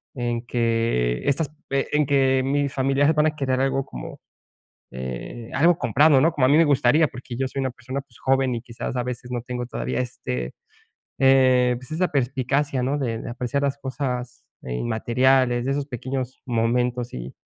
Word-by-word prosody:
en 120 Hz, -1 st, -2 dB
que 115 Hz, -, 0 dB
estas, 140 Hz, +1 st, +1 dB, 0.2 s
eh, 140 Hz, 0 st, +1 dB
en 150 Hz, 0 st, +3 dB
que 135 Hz, -1 st, +3 dB
mis 140 Hz, 0 st, 0 dB
familiares 135 Hz, +3 st, +2 dB
van 150 Hz, 0 st, +4 dB
a 155 Hz, -, -1 dB
querer 130 Hz, -2 st, 0 dB
algo 135 Hz, 0 st, 0 dB
como, -, -, -8 dB, 0.7 s
eh, 65 Hz, -, -6 dB
algo 165 Hz, +5 st, +4 dB
comprado, 145 Hz, 0 st, +4 dB
¿no?, 160 Hz, +4 st, +4 dB
como 145 Hz, -5 st, +1 dB
a -, -, +3 dB
mí 145 Hz, -, +5 dB
me 165 Hz, -, +6 dB
gustaría, 145 Hz, +1 st, +4 dB
porque 125 Hz, -2 st, -8 dB
yo 130 Hz, 0 st, -1 dB
soy 135 Hz, -, -7 dB
una 130 Hz, -, -1 dB
persona, 130 Hz, +3 st, -5 dB
pues, 135 Hz, -3 st, -19 dB
joven, 135 Hz, -1 st, +2 dB
y 115 Hz, -, -4 dB
quizás 120 Hz, 0 st, -6 dB
a 125 Hz, -, 0 dB
veces, 125 Hz, 0 st, -6 dB
no 120 Hz, -, -1 dB
tengo 125 Hz, 0 st, -4 dB
todavía 65 Hz, -, -3 dB
este, 60 Hz, 0 st, -4 dB, 0.7 s
eh, 130 Hz, -2 st, +5 dB
pues, 125 Hz, -, -12 dB
esa 175 Hz, +3 st, 0 dB
perspicacia, 135 Hz, 0 st, 0 dB
¿no?, 135 Hz, +3 st, 0 dB
de 115 Hz, -4 st, -2 dB
de -, -, -7 dB
apreciar 125 Hz, +4 st, -2 dB
las 140 Hz, 0 st, 0 dB
cosas, 125 Hz, -2 st, -4 dB, 0.2 s
eh, 60 Hz, -, -5 dB
inmateriales, 120 Hz, -, +2 dB
de 135 Hz, -, 0 dB
esos 140 Hz, 0 st, -2 dB
pequeños 130 Hz, 0 st, -4 dB
momentos. 120 Hz, +1 st, 0 dB
Y 60 Hz, +1 st, -7 dB
130 Hz, 185 wpm, -23 LUFS, 120-140 Hz, 0.7 s, me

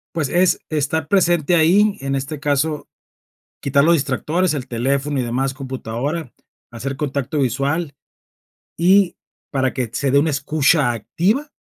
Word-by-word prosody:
Pues, 150 Hz, -5 st, -1 dB
es 180 Hz, +3 st, +3 dB
estar 155 Hz, 0 st, -1 dB
presente 175 Hz, -3 st, +2 dB
ahí, 195 Hz, +6 st, +4 dB
en 135 Hz, 0 st, -2 dB
este 135 Hz, +2 st, -4 dB
caso, 145 Hz, +1 st, -1 dB, 0.7 s
quitar 140 Hz, 0 st, +2 dB
los 170 Hz, +2 st, +5 dB
distractores, 155 Hz, +4 st, 0 dB
el 135 Hz, -3 st, -5 dB
teléfono 135 Hz, +4 st, -1 dB
y -, -, 0 dB
demás, 130 Hz, +3 st, -1 dB
computadora, 130 Hz, +2 st, -4 dB, 0.4 s
hacer 130 Hz, +3 st, -5 dB
contacto 140 Hz, 0 st, -2 dB
visual 140 Hz, +4 st, -1 dB, 0.8 s
y, 185 Hz, +1 st, +4 dB, 0.4 s
para 130 Hz, -2 st, 0 dB
que 125 Hz, -3 st, -2 dB
se 135 Hz, +2 st, 0 dB
dé 140 Hz, -, +5 dB
una 155 Hz, +3 st, +1 dB
escucha 140 Hz, 0 st, +2 dB
activa 205 Hz, -, -1 dB
145 Hz, 140 wpm, -20 LUFS, 135-165 Hz, 0.8 s, los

